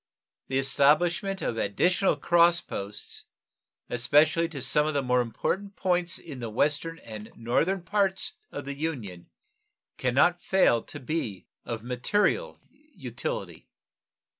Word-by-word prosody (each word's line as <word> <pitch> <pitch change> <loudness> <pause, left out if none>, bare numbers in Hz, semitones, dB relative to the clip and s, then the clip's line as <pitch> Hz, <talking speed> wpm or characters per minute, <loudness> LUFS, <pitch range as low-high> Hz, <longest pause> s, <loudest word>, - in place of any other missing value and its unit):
The 130 - -1
establishment 165 +8 +2
of 115 - -2
additional 180 - +2
cross 170 0 +4
posts, 100 - -7 0.6
especially 150 +7 +3
to 150 -4 -7
some 135 +4 +1
of 155 - -2
the 140 - +1
important 125 - -1
points 180 -1 0
in 145 -6 -9
the 115 -2 -4
Western 150 +8 0
and 110 -5 -9
Northern 165 +11 0
parts 195 -1 +1 0.2
of - - -6
the 140 - -4
Union, 125 - -5 0.7
can 125 -1 0
not 175 +5 +4
fail 185 -11 +3
to - - -9
be 125 - -3 0.2
of 115 -2 -5
material 205 - 0 0.4
utility. - - -5
150 Hz, 125 wpm, -27 LUFS, 120-175 Hz, 0.7 s, cross